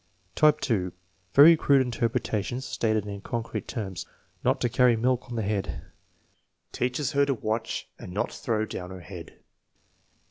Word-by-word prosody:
Type 150 +3 +4
(2), 90 -7 0 0.4
very 155 +4 +9
crude 140 -3 +4
interpretations 120 0 -2
stated 110 -4 0
in 100 -1 -6
concrete 115 -2 -4
terms: 95 -6 -5 0.4
"Not - - +2
to - - +3
carry 125 0 +4
milk 125 +2 0
on 120 - -5
the 110 - -1
head." 100 -1 -3 0.8
"Teaches 125 +3 -1
her 140 0 +3
to 140 -1 +1
watch 110 0 -3
and - - -8
not 100 - -1
throw 110 -2 -1
down 90 -4 -6
her 95 -1 -8
head." 85 -2 -10
115 Hz, 150 wpm, -27 LUFS, 100-125 Hz, 0.8 s, very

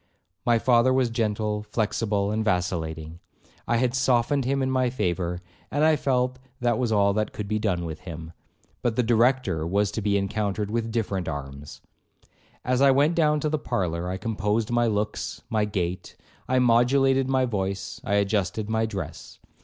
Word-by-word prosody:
My 120 -1 +5
father 120 +1 +4
was 130 -2 +2
gentle, 105 -2 -1
flexible, 105 -1 -1
and 110 +1 0
vacillating. 85 -5 -2 0.5
I 120 - +2
had 125 0 +1
softened 130 +1 +2
him 135 +1 +1
in 130 - 0
my 130 -1 +2
favour, 90 -6 -2 0.3
and 145 +2 0
I 160 0 +5
felt 130 -2 0 0.2
that 120 -2 +1
was 120 -3 0
all 100 -2 +3
that 110 +1 -1
could 105 - -5
be 110 +1 -1
done 90 -5 -1
with 80 -1 -6
him. 85 -2 -8 0.5
But 120 -2 0
the 125 - +2
Director 115 -7 +2
was 100 +3 +1
to 110 - -3
be 100 0 +1
encountered 100 +1 -2
with 115 0 -1
different 100 -5 -2
arms. 70 -1 -7 0.8
As 125 +1 +1
I 140 - +6
went 140 +5 +4
down 150 -3 +2
to 155 - 0
the 155 0 -1
parlour, 90 - -2
I 95 - -3
composed 110 +1 -1
my 120 0 +2
looks, 105 -1 -2
my 110 -2 +2
gait, 90 -3 -3 0.3
I 130 - +2
modulated 130 +2 +3
my 130 -1 +2
voice, 95 -4 -3
I 100 - 0
adjusted 100 +1 0
my 110 0 +1
dress. 100 -4 -7
110 Hz, 175 wpm, -25 LUFS, 95-125 Hz, 0.8 s, I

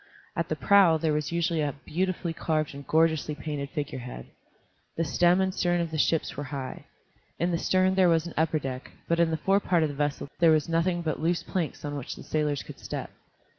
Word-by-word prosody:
At - - -1
the - - 0
prow 195 -5 +5
there 155 -1 0
was 150 0 -1
usually 170 -1 0
a 145 -2 -1
beautifully 175 0 -1
carved 155 -2 -1
and 140 0 -10
gorgeously 160 -1 +2
painted 145 -2 -4
figurehead. 130 - -5 0.7
The 165 - +2
stem 175 +4 +3
and 190 0 +1
stern 175 -1 +1
of 170 -2 -2
the 155 - -2
ships 160 +2 +1
were 145 - -4
high. 135 -1 -6 0.5
In 175 +2 0
the 170 - 0
stern 185 +1 +2
there 190 -2 +4
was 165 -1 +3
an 170 - -7
upper 160 0 +2
deck, 130 -3 -5 0.2
but 170 0 +1
in 170 -1 +4
the 160 - 0
forepart 185 -1 +2
of 155 - +1
the - - -5
vessel 145 0 -1
there 170 -1 +6
was 155 -1 +3
nothing 170 +1 +1
but 155 -2 -2
loose 170 +2 +1
planks 170 -5 -3
on 145 0 -3
which 135 - -5
the - - -10
sailors 150 -2 -1
could - - -11
step. - - -5
160 Hz, 215 wpm, -27 LUFS, 150-175 Hz, 0.7 s, there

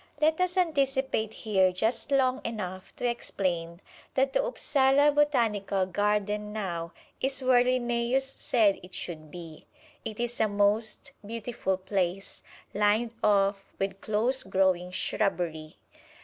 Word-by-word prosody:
Let 315 +3 +2
us 365 0 0
anticipate 270 - +1
here 190 -4 +2
just 220 +10 -1
long 265 -1 +2
enough 190 -5 -5
to 245 - -1
explain 175 -7 -2 0.3
that 270 0 +2
the - - +2
Upsala 285 - +3
Botanical 230 -10 +1
Garden 210 +2 -1
now 175 -6 -4 0.3
is 270 0 +1
where 255 -1 +5
Linnæus 250 +1 0
said 210 -5 +2
it 185 +1 -11
should 155 -3 -6
be. 165 -2 -10 0.4
It 215 0 -6
is 240 0 -3
a 220 - +4
most 210 +2 +1
beautiful 215 -3 -3
place, 190 0 -3 0.3
lined 210 +3 +2
off 200 -1 +3
with 195 0 -3
close 230 +5 +1
growing 190 -2 +1
shrubbery. 175 -5 -2
210 Hz, 125 wpm, -28 LUFS, 190-255 Hz, 0.4 s, where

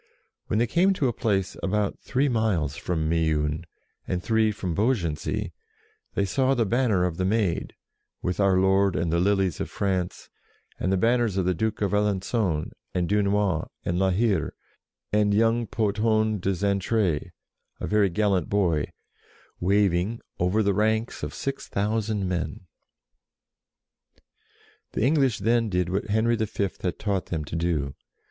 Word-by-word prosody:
When 105 - 0
they 115 - +3
came 180 +9 +3
to 145 -8 0
a 120 - 0
place 100 -5 0
about 100 +1 -1
three 135 +2 0
miles 105 - 0
from 80 -1 -2
Meun, 80 -1 0 0.4
and 90 0 -2
three 110 -1 +2
from 95 -4 -3
Beaugency, 95 - -1 0.6
they 100 - +2
saw 130 +7 +2
the 115 -3 +2
banner 110 -4 +2
of 85 -2 -2
the 95 - 0
Maid, 95 -3 0 0.5
with 90 +2 -2
Our 100 -2 +4
Lord 95 0 +3
and 85 +1 0
the 85 - +3
Lilies 95 -2 +1
of - - -3
France, 95 -3 -2 0.5
and 95 - 0
the 95 - +2
banners 115 -1 +2
of 95 - +1
the 90 - +2
Duke 110 +3 -1
of 100 - 0
Alengon, 100 -4 0 0.2
and 90 -1 +1
Dunois, 100 -4 +1 0.2
and 85 +1 0
La 95 0 +3
Hire, 95 -4 +1 0.6
and 105 -1 +3
young 115 +1 +2
Pothon 110 0 +1
de 95 +1 0
Xaintrailles, 100 -3 0 0.5
a - - -3
very 105 -2 +3
gallant 100 -2 +1
boy, 85 -7 +1 0.7
waving 100 +3 +2 0.2
over 90 +5 +2
the 100 -1 +2
ranks 110 +3 0
of - - -3
6000 105 -5 -2
men. 85 -4 -3 2.3
The - - 0
English 135 -3 +3
then 115 +2 +1
did 90 -2 0
what 95 +3 -1
Henry 110 +3 +2
V. 100 -3 -1
had 90 -5 -2
taught 100 -3 -1
them 80 -3 -3
to 75 - -6
do. 80 -5 -1
100 Hz, 150 wpm, -26 LUFS, 90-110 Hz, 2.3 s, Our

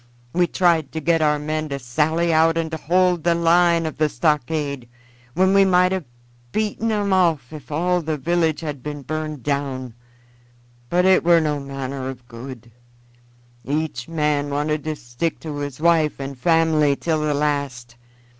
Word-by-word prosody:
We 175 0 +3
tried 170 -6 +2
to 160 - -2
get 165 +1 +1
our 150 -1 +3
men 155 +1 -3
to 140 - -3
sally 160 +7 0
out 165 +1 +4
and 165 -1 -2
to 160 - -3
hold 180 +2 +2
the 170 0 +3
line 170 0 +3
of 155 0 -5
stockade, 140 -2 -1 0.5
when 190 +2 +3
we 195 0 +6
might 180 -1 +4
have 190 -4 -2 0.5
beaten 215 +1 -1
'em 205 -2 0
off 165 -8 +1
if 150 -1 -10
all 175 +4 +1
the 155 -1 -2
village 165 +2 0
had 150 -4 -5
been 145 +1 -6
burned 155 -1 -4
down; 135 -4 -2 1.0
but 180 +1 +2
it 190 0 +5
were 170 0 +5
no 150 -2 -1
manner 135 -1 -5
of 125 -2 -10
good; 120 -1 -10 0.9
each 145 -4 -3
man 150 -3 0
wanted 150 +1 -1
to 155 -1 -2
stick 120 +5 -4
to 150 -3 -6
his 145 -2 -5
wife 160 -3 +2
and 135 0 -5
family 160 -2 +3
till 160 +1 -1
the 150 -1 0
last. 140 -5 -2
155 Hz, 165 wpm, -22 LUFS, 140-170 Hz, 1.0 s, we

